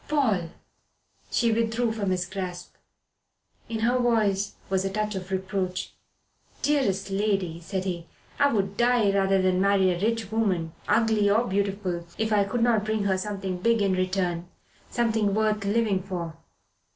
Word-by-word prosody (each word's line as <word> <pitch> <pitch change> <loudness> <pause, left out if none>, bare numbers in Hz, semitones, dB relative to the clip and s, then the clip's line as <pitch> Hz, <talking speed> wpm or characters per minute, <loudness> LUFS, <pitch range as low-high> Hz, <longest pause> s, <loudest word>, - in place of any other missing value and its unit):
"Paul!" 220 - +1 0.8
She 235 -2 +2
withdrew 225 +1 +1
from 205 -3 -2
his 180 -1 0
grasp. 180 -1 -6 1.0
In 225 -1 -3
her 245 +2 +2
voice 210 -5 +1
was 190 0 0
a 195 - -1
touch 210 +2 -2
of 190 -1 -6
reproach. 190 -1 -2 0.7
"Dearest 200 -10 +1
lady," 195 -4 0
said 185 +2 -3
he, 170 -3 -4 0.3
"I 285 0 +4
would 200 -2 -1
die 240 -4 +3
rather 195 -1 +2
than 185 0 +2
marry 195 -1 +4
a 175 0 -3
rich 225 -1 -1
woman, 185 -8 0
ugly 220 -3 +3
or 220 +4 +3
beautiful, 195 -3 -1
if 220 0 0
I 205 -1 +4
could 230 +4 -1
not 230 -3 +3
bring 215 -1 -1
her 195 -1 +2
something 190 -2 -3
big 230 +3 +2
in 195 -1 +2
return 185 -2 -1 0.4
something 220 -4 +1
worth 215 -1 +1
living 205 -2 +1
for." 175 -4 -5
200 Hz, 155 wpm, -26 LUFS, 185-220 Hz, 1.0 s, I